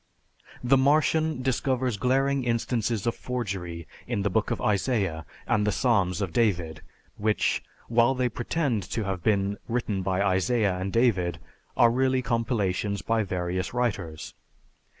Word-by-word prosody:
The 130 +2 +4
Martian 150 +1 +2
discovers 130 -1 0
glaring 135 +3 +1
instances 115 -2 -1
of 115 - +1
forgery 95 -9 -4 0.2
in 115 -5 -1
the 100 - 0
book 110 +2 +1
of - - -2
Isaiah 100 - 0 0.2
and 105 - +1
the - - +3
Psalms 100 -3 +1
of 90 -4 -4
David, 85 -9 0 0.4
which, 105 0 +1 0.3
while 120 +3 +3
they 125 -1 +1
pretend 120 0 -1
to 110 - -2
have 95 -2 -3
been 100 0 +1
written 115 -5 -1
by 95 +1 0
Isaiah 100 +1 +2
and 95 +1 -3
David, 95 -8 +2 0.4
are 120 -1 +6
really 130 +1 +1
compilations 105 -4 -1
by 115 0 +1
various 90 +1 -3
writers. 100 -10 -2
110 Hz, 140 wpm, -26 LUFS, 95-125 Hz, 0.4 s, are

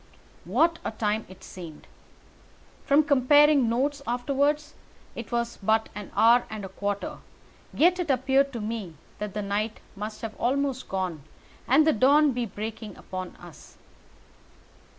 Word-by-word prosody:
What 320 - +2
a - - -2
time 215 0 -2
it 185 - -14
seemed! 165 -5 -10 1.0
From 285 +3 +5
comparing 285 -1 +5
notes 275 +5 0
afterwards 285 +5 0 0.4
it 235 - -7
was 235 0 -2
but 220 +3 +1
an 205 -1 -8
hour 235 +2 +5
and 215 -2 -6
a - - -8
quarter, 200 +1 -4 0.5
yet 360 +3 +3
it 345 -4 -2
appeared 270 +1 +2
to 235 - -4
me 210 -6 -5 0.2
that 210 -1 -5
the 210 - -2
night 210 +2 -2 0.2
must 210 +2 -6
have 220 -1 -4
almost 270 +1 -1
gone, 185 -5 -3 0.5
and 290 +5 +5
the 315 - +4
dawn 285 +6 +4
be 245 -2 -2
breaking 215 0 -7
above 185 -1 -7
us. 175 -4 -14
235 Hz, 145 wpm, -26 LUFS, 210-280 Hz, 1.0 s, From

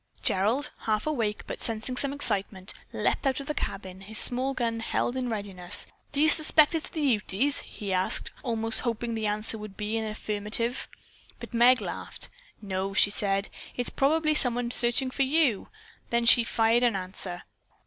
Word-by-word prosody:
Gerald, 220 +10 +1 0.2
half 215 -1 0
awake, 230 -9 -2
but - - -7
sensing 225 +2 -3
some 275 +2 +1
excitement, 195 -8 -2 0.2
leaped - - -1
out 265 0 0
of 275 - -7
the 300 - -3
cabin, 190 -7 -5
his 215 +3 -2
small 260 +2 +2
gun 230 -2 -2
held 235 +2 -2
in 255 -1 -2
readiness. 195 -5 -4 0.3
"Do 285 - -2
you 310 - +5
'spect 310 0 +8
it's 325 - -3
the 315 - -5
Utes?" 250 +2 +1
he 200 -2 -6
asked, 185 0 0
almost 225 -3 -1
hoping 235 -1 -3
that 225 - -3
the 215 - 0
answer 215 +1 -2
would 210 -2 -10
be 210 +1 -3
in 225 - -2
the - - -4
affirmative. 215 +3 -3 0.5
But - - -10
Meg 245 +2 +5
laughed. - - -5 0.3
"No," 195 0 -3
she 200 - +4
said. 200 -1 0 0.3
"It - - 0
is 245 - -1
probably 310 +3 +1
someone 245 -4 +2
searching 245 +2 0
for 275 - -3
you." 270 -6 +2 0.4
Then 235 0 0
she 235 0 +7
fired 230 +1 +2
in 240 -4 +2
answer. 185 -1 -3
230 Hz, 180 wpm, -27 LUFS, 205-260 Hz, 0.5 s, spect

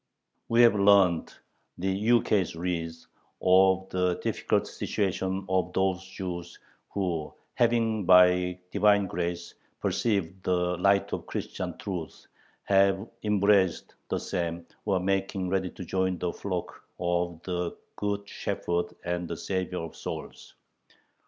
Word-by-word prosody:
We 115 +1 +6
have 115 - +7
learned 100 -4 +4 0.5
the 95 +2 -1
ukase 105 -3 +2
reads 85 -1 -4 0.3
of 95 0 +4
the 90 -1 +1
difficult - - 0
situation 95 -1 -2
of 90 -1 0
those 95 -1 +1
Jews 90 -2 -6 0.3
who, 85 -6 -2 0.2
having 115 -4 +1
by 90 0 +6
Divine 100 0 +4
Grace 85 -1 -3 0.3
perceived 95 -5 -1
the 90 -1 +1
light 100 +1 +3
of - - -4
Christian - - -4
truth, 90 -5 -6 0.4
have 95 +1 +3
embraced 100 -3 +2 0.2
the - - 0
same, 85 -2 -3 0.2
or 100 -2 +2
are - - +2
making 95 0 -1
ready 95 -1 0
to 90 - -9
join 95 +1 0
the 85 0 -2
flock 90 -3 -5 0.2
of 85 -1 -1
the 90 -2 -3 0.2
good 100 0 -2
Shepherd 85 -2 -2
and 90 0 -2
the 85 - -4
Savior 90 -1 -2
of 80 - -8
souls. - - -7
95 Hz, 125 wpm, -28 LUFS, 90-100 Hz, 0.5 s, have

